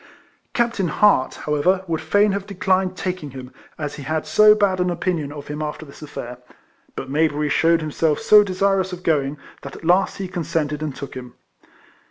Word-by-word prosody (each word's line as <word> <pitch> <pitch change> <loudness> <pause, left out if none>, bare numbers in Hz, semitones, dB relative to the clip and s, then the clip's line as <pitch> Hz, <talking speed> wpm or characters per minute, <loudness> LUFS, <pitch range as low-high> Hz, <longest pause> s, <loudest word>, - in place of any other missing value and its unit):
Captain 235 -6 +1
Hart, 170 -4 +3
however, 165 +6 +1
would 165 -3 -2
fain 205 +6 +3
have 200 0 -3
declined 185 -1 0
taking 180 -5 -4
him, 130 -1 -10 0.2
as 150 -2 -5
he - - -7
had 155 +3 -2
so 210 +7 +6
bad 200 -3 +1
an 180 0 +1
opinion 170 -4 -2
of 145 -1 -9
him 150 +1 -5
after 155 +1 -5
this 140 - -14
aiFair; 125 -5 -8 0.6
but - - -5
Mayberry 150 +1 0
shewed 165 +3 +3
himself 155 0 0
so 210 0 +6
desirous 190 0 0
of 180 0 -8
going, 145 -3 0 0.2
that - - -9
at - - -11
last 180 +3 +2
he 195 - -4
consented, 165 -4 -2
and 150 -4 -4
took 140 - -8
him. 125 -1 -9
165 Hz, 185 wpm, -21 LUFS, 150-190 Hz, 0.6 s, so